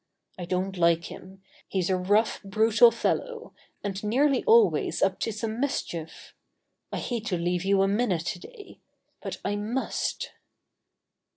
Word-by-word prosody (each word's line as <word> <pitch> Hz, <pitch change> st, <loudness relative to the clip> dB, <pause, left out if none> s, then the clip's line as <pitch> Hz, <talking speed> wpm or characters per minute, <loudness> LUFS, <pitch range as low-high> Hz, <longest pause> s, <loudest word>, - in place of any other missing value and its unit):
I 175 Hz, -, -4 dB
don't 185 Hz, +2 st, -2 dB
like 170 Hz, 0 st, +2 dB
him. 190 Hz, +1 st, -12 dB, 0.2 s
He's 190 Hz, -1 st, -1 dB
a -, -, +3 dB
rough, 205 Hz, +5 st, +1 dB
brutal 220 Hz, +3 st, +5 dB
fellow, 465 Hz, -, -2 dB, 0.3 s
and 195 Hz, -1 st, -4 dB
nearly 265 Hz, +5 st, +2 dB
always 455 Hz, -1 st, +4 dB
up -, -, +1 dB
to 225 Hz, -, -1 dB
some 220 Hz, +1 st, -4 dB
mischief. 175 Hz, -, -4 dB, 0.6 s
I -, -, -3 dB
hate 230 Hz, -3 st, -3 dB
to 180 Hz, -, 0 dB
leave 175 Hz, +1 st, -1 dB
you 195 Hz, 0 st, +3 dB
a -, -, +3 dB
minute 200 Hz, -5 st, 0 dB
today. 405 Hz, -, -8 dB, 0.4 s
But -, -, -5 dB
I 205 Hz, -, 0 dB
must." 225 Hz, +6 st, -2 dB
205 Hz, 145 wpm, -27 LUFS, 185-235 Hz, 0.6 s, brutal